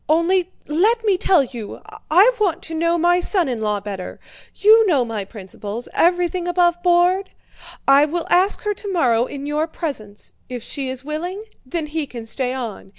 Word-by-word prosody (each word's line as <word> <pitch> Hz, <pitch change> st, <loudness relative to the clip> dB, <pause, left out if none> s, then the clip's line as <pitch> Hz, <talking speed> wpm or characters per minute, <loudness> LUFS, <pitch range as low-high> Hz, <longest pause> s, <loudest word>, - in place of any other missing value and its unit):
Only 350 Hz, +3 st, +2 dB, 0.2 s
let 425 Hz, +10 st, +2 dB
me 405 Hz, -3 st, +4 dB
tell 360 Hz, -4 st, +3 dB
you, 235 Hz, -5 st, -8 dB, 0.3 s
I 385 Hz, +10 st, +6 dB
want 375 Hz, -3 st, 0 dB
to 325 Hz, -, -7 dB
know 335 Hz, +1 st, +1 dB
my 350 Hz, +1 st, +3 dB
son 360 Hz, -2 st, +1 dB
in 240 Hz, -4 st, -3 dB
law 210 Hz, -1 st, 0 dB
better. 195 Hz, -2 st, -7 dB, 0.4 s
You 440 Hz, +2 st, +6 dB
know 280 Hz, -9 st, +2 dB
my 220 Hz, -3 st, -4 dB
principles—everything 245 Hz, -, -2 dB
aboveboard! 355 Hz, +1 st, +2 dB, 0.6 s
I 275 Hz, +2 st, +6 dB
will 330 Hz, +2 st, -3 dB
ask 370 Hz, +3 st, +3 dB
her 420 Hz, -1 st, 0 dB
tomorrow 330 Hz, -, +1 dB
in 280 Hz, +1 st, -7 dB
your 300 Hz, +2 st, -1 dB
presence; 230 Hz, -, -6 dB, 0.2 s
if 245 Hz, -2 st, -6 dB
she 275 Hz, -2 st, -4 dB
is 260 Hz, +1 st, -6 dB
willing, 350 Hz, +7 st, -4 dB, 0.2 s
then 315 Hz, +4 st, -4 dB
he 300 Hz, -1 st, -3 dB
can 235 Hz, -3 st, -8 dB
stay 250 Hz, +2 st, -2 dB
on. 235 Hz, -6 st, -6 dB
320 Hz, 165 wpm, -20 LUFS, 250-360 Hz, 0.6 s, I